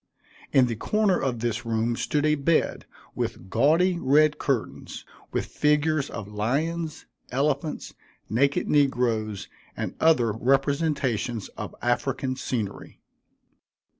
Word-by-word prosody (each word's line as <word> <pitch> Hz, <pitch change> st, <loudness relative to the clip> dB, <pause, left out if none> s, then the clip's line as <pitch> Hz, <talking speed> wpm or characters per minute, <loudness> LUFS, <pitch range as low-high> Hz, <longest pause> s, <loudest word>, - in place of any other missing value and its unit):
In 130 Hz, -2 st, +5 dB
the 120 Hz, -2 st, -2 dB
corner 205 Hz, -, +1 dB
of 125 Hz, -4 st, -2 dB
this 120 Hz, 0 st, -1 dB
room 115 Hz, 0 st, 0 dB
stood 145 Hz, +5 st, 0 dB
a 155 Hz, -, +4 dB
bed 155 Hz, +2 st, +1 dB, 0.3 s
with 95 Hz, -, -4 dB
gaudy 170 Hz, +4 st, +3 dB
red 150 Hz, +1 st, +3 dB
curtains, 135 Hz, -5 st, -3 dB, 0.3 s
with -, -, -1 dB
figures 150 Hz, -1 st, +1 dB
of 100 Hz, -, -6 dB
lions, 150 Hz, +10 st, -2 dB, 0.2 s
elephants, 140 Hz, +3 st, -1 dB, 0.3 s
naked 140 Hz, +5 st, +1 dB
negroes, 120 Hz, -8 st, +1 dB, 0.3 s
and -, -, -3 dB
other 130 Hz, -9 st, +4 dB
representations 135 Hz, -, 0 dB
of -, -, -8 dB
African 130 Hz, +2 st, 0 dB
scenery. 125 Hz, -6 st, -4 dB
135 Hz, 110 wpm, -26 LUFS, 115-150 Hz, 0.3 s, In